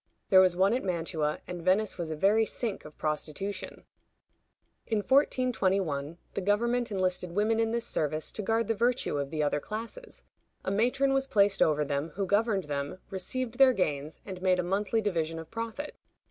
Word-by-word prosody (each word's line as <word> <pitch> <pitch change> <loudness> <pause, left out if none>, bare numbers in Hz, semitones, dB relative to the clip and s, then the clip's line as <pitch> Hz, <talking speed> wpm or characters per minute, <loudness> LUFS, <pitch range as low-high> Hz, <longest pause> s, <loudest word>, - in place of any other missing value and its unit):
There 190 -1 +9
was 185 -2 +4
one 190 +4 +3
at 255 - -1
Mantua, 165 -4 -1
and 180 -1 -6
Venice 190 +3 +1
was 170 -2 -3
a 155 - -2
very 205 +7 +4
sink 220 -1 -3
of 150 - -12
prostitution. 155 +6 -3 1.0
In 220 - +1
1421, 195 - +1 0.2
the - - -2
government 235 +4 +1
enlisted 185 -2 -1
women 215 +3 +2
in 225 0 +2
this 235 +1 -1
service 155 +1 -1
to - - -4
guard 225 +2 +1
the 225 - +2
virtue 235 - 0
of 140 -1 -2
the 155 +1 -1
other 145 0 +1
classes. 230 - -6 0.4
A 190 - 0
matron 250 +6 +2
was 270 0 +1
placed 200 -3 +3
over 150 -1 +3
them, 145 +2 -2
who 195 0 -1
governed 205 0 +2
them, 145 +1 -4
received 235 +6 -3
their 265 -1 +7
gains, 150 - -2
and 185 -2 -7
made 185 -1 +3
a 180 - 0
monthly 200 +5 0
division 165 -6 -1
of 165 -1 -9
profit. 230 +6 -5
195 Hz, 180 wpm, -29 LUFS, 165-225 Hz, 1.0 s, There